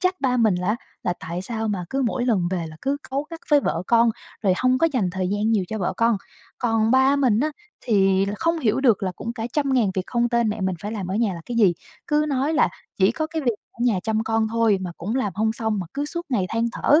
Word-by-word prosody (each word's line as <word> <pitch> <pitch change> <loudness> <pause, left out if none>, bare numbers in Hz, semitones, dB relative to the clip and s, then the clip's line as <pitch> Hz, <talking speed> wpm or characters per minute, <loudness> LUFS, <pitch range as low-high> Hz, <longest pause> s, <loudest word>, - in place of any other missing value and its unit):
trách 370 0 0
ba 255 -2 +1
mình 220 -5 +4
là, 180 - -3
á, 215 - +2 0.3
là 175 - 0
tại 170 +3 -4
sao 225 0 -3
mà 185 -4 -2
cứ 270 0 0
mỗi 245 0 0
lần 195 -8 +2
về 175 -3 -2
là 155 0 -10
cứ 275 +1 0
cáu 275 +2 0
gắt 330 -1 -7
với 290 -1 +6
vợ 165 -8 -1
con, 235 0 +4 0.3
rồi 195 - +3
hông 255 +3 +2
có 330 - +4
dành 200 -9 +1
thời 185 0 -2
gian 205 +2 0
nhiều 210 -5 +2
cho 220 - -3
vợ 185 0 -1
con. 230 -1 +3 0.4
Còn 225 -2 +1
ba 265 +2 +5
mình 250 -5 +3
á, 305 - +1 0.3
thì 195 -4 +3
là 205 - -2
không 335 0 +1
hiểu 245 -4 +1
được 235 -8 +3
là 185 -2 -1
cũng 230 +1 -4
cả 230 -1 -4
trăm 280 -3 +1
ngàn 220 -6 +3
việc 185 - 0
không 240 -1 +1
tên 235 -2 +2
mẹ 210 0 -3
mình 190 -1 0
phải 210 +2 -4
làm 200 -5 -4
ở 185 - -3
nhà 215 -4 +1
là 170 - -7
cái 240 - -4
gì. 200 -6 +5 0.3
Cứ 300 0 +2
nói 280 +2 0
là 305 - +4 0.3
chỉ 195 +4 +4
có 315 +3 -2
cái 320 -1 -4
việc 240 - +2 0.2
ở - - -26
nhà 220 -6 +3
chăm 220 +1 0
con 225 0 +1
thôi 225 -3 +2
mà 180 -2 -4
cũng 210 +9 -3
làm 210 -7 0
hông 220 +2 +1
xong, 220 -3 -1
mà 185 - -4
cứ 285 +1 -1
suốt 340 +3 -5
ngày 210 -9 0
than 230 +1 0
thở, 295 +5 +4
225 Hz, 280 wpm, -23 LUFS, 195-260 Hz, 0.4 s, với